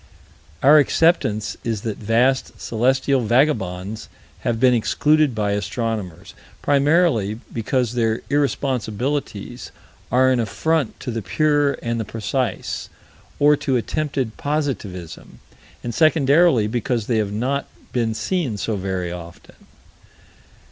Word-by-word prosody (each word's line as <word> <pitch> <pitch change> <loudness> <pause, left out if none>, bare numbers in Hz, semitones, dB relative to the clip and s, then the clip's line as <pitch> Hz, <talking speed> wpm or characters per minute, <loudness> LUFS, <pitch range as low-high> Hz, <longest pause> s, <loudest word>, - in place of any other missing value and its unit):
Our 150 +3 +8
acceptance 110 - +2
is 115 -3 -2
that 110 -2 -4
vast 120 +5 +1
celestial 130 +3 +1
vagabonds 110 -5 0 0.3
have 115 -1 -1
been 125 0 +5
excluded 150 +4 +2
by 105 -1 0
astronomers, 105 -4 -3 0.3
primarily 140 - +2
because 120 +1 -1
their 115 -2 0
irresponsibilities 130 -4 -2 0.4
are 130 +2 +4
an 125 - +2
affront 150 +4 -1
to 125 - -4
the 115 -1 -3
pure 145 +4 +2
and 115 0 -1
the - - -1
precise, 115 +4 -3 0.5
or 150 +1 +5
to 130 -2 0
attempted 135 -2 -2
positivism; 125 - -4 0.5
and 120 - -4
secondarily 155 -3 +4
because 115 0 -1
they 115 -1 0
have 105 -2 0
not 130 +7 -1 0.3
been 115 -3 0
seen 155 - -1
so 105 +2 -2
very 95 -2 -3
often. 85 -1 -11
120 Hz, 115 wpm, -21 LUFS, 110-140 Hz, 0.5 s, Our